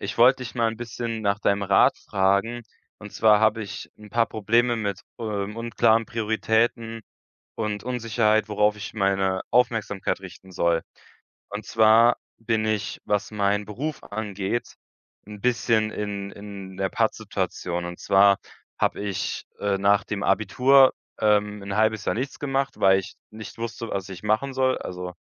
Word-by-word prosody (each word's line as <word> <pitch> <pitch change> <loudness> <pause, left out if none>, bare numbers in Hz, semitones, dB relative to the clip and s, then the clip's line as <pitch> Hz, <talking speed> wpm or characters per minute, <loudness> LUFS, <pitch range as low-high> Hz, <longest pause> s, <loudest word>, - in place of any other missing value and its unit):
ich - - -5
wollte 130 +3 +6
dich 125 0 -8
mal 115 - +2
‘n - - -9
bisschen 115 -1 -5
nach 100 -1 +1
deinem 100 -1 +1
Rat 100 -1 +4
fragen, 100 +5 0 0.4
und 105 -1 -11
zwar 105 -2 +5
habe 110 +1 +2
ich 100 - -8
‘n 105 -1 -14
paar 115 -1 +2
Probleme 115 +3 +1
mit, 100 -4 -3 0.2
äh, - - -7
unklaren 110 +2 +1
Prioritäten 115 0 0 0.5
und 105 -2 -3
Unsicherheit, 115 -3 +1
worauf 105 0 +2
ich 105 0 -7
meine 95 -2 +1
Aufmerksamkeit 110 -6 +1
richten 95 0 -12
soll. 85 -2 +1 0.7
Und 105 +1 -6
zwar 115 +2 +5 0.2
bin 115 -1 0
ich, 110 -1 -2
was 105 +2 0
meinen 105 -1 0
Beruf 135 +9 -5
angeht, 105 +1 -4 0.5
‘n 105 -1 -9
bisschen 115 -2 +1
in 100 -2 -4
in 100 -2 -9
der 95 0 -1
Patt-Situation, 85 -1 -2
und 85 0 -7
zwar 100 0 +5 0.4
habe - - 0
ich, 100 -2 -3 0.2
äh, 100 -1 0
nach 100 0 +3
dem 100 0 -4
Abitur, 130 +7 +5 0.3
ähm, 105 -1 +2
‘n 100 0 -5
halbes 110 0 +1
Jahr - - 0
nichts 130 +4 -4
gemacht, 135 -1 -2
weil 95 0 +5
ich 95 - -9 0.2
nicht 110 +1 -10
wusste, 115 0 -5
was 95 -1 -4
ich 95 -1 -9
machen 110 +6 0
soll. 130 -1 +2
Also, 90 0 -6
105 Hz, 155 wpm, -24 LUFS, 100-115 Hz, 0.7 s, wollte